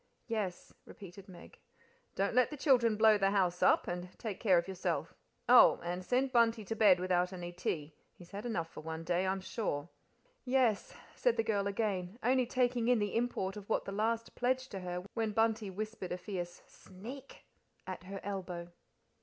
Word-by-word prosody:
"Yes," 210 -6 -4
repeated 195 0 -12
Meg. 175 -2 -13 0.6
"Don't 200 +3 0
let 250 0 +4
the 300 - -7
children 245 -6 +4
blow 215 -1 +6
the 195 0 +3
house 185 -3 +1
up, - - +4
and 175 +1 -4
take 215 -5 -5
care 190 -5 +4
of 170 - 0
yourself 190 -2 -2 0.3
oh! - - +7
and 175 +1 -3
send 255 +6 +1
Bunty 230 -3 +3
to 225 - -3
bed 205 -5 +6
without 180 0 +1
any 175 -2 -6
tea 160 -4 -3 0.2
he's 175 -1 -16
had 200 +1 -6
enough 195 -9 -2
for - - -10
one 160 +1 -5
day, 180 +3 0
I'm 190 0 -1
sure." 175 -7 -3 0.5
"Yes," 250 -5 +1 0.2
said - - +1
the - - +2
girl 200 -3 0
again, 200 -2 -2
only 255 +1 +3
taking 245 -2 +1
in 250 0 +5
the 205 -2 -1
import 225 -5 -1
of 205 0 -10
what - - 0
the - - -5
last 225 +3 -1
pledged 255 0 -1
her 180 -2 -4
to - - -13
when 220 -2 -1
Bunty 225 -1 +1
whispered 215 -1 -5
a 180 - -2
fierce 175 -2 -6
"Sneak!" 245 +9 -11 0.4
at 185 -1 -7
her 195 +1 -6
elbow. 180 -3 -5
200 Hz, 185 wpm, -33 LUFS, 180-230 Hz, 0.6 s, oh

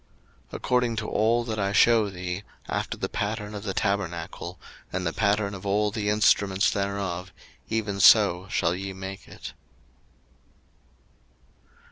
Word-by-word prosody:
02:025:009 - - -27
According 125 -2 +1
to 110 -1 -3
all 115 +3 +2
that 110 -2 -4
I 100 0 0
shew 110 +1 +5
thee, 90 +1 -5 0.2
after - - -2
the - - -2
pattern 105 0 -3
of 105 - -5
the 100 -2 -4
tabernacle, 90 -3 -2 0.3
and 95 0 -2
the 85 - -1
pattern 100 -1 +1
of 100 - -8
all 105 +1 +1
the 105 -1 -2
instruments 100 -2 +3
thereof, 100 -2 -3 0.4
even 105 -3 -2
so 95 -2 +6
shall 85 -2 +1
ye 95 +1 -5
make 95 +1 -8
it. - - -9
100 Hz, 140 wpm, -26 LUFS, 95-105 Hz, 0.4 s, so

